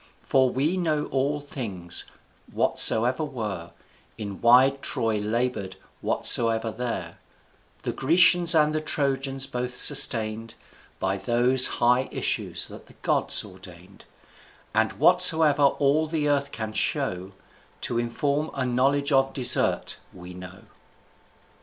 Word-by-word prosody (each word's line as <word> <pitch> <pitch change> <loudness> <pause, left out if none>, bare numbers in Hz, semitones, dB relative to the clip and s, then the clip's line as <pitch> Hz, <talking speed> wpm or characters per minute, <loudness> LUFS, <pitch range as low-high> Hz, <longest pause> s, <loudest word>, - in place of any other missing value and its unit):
For 130 -1 +1
we 150 +9 -2
know 155 -4 -1
all 140 +2 -1
things, 105 -12 -6 0.5
whatsoever 125 +7 +2
were 105 - -6 0.5
In 100 -3 -8
wide 130 +3 +4
Troy 110 -2 -1
labor'd, 105 -3 -3 0.3
whatsoever 115 -1 +2
there 120 +1 -6 0.6
The - - -3
Grecians 170 +3 +3
and 155 -1 +2
the 155 - -2
Trojans 135 -2 -1
both 125 -1 -5
sustain'd, 110 0 +1 0.4
By 95 +1 -2
those 125 +4 +5
high 125 +2 +1
issues - - -1
that - - -13
the - - -19
gods - - 0
ordain'd; 90 0 -15 0.7
And 110 +1 0
whatsoever 160 -5 +5
all 145 +3 +1
the 155 -2 -2
earth 140 -1 -1
can 110 -1 -6
show 95 -2 -2 0.5
To 120 - -1
inform 140 +6 -2
a 135 -2 -2
knowledge 135 +4 0
of 135 -1 +1
desert, 125 -3 0
we 90 0 -12
know. 90 +2 -12
125 Hz, 120 wpm, -24 LUFS, 110-145 Hz, 0.7 s, those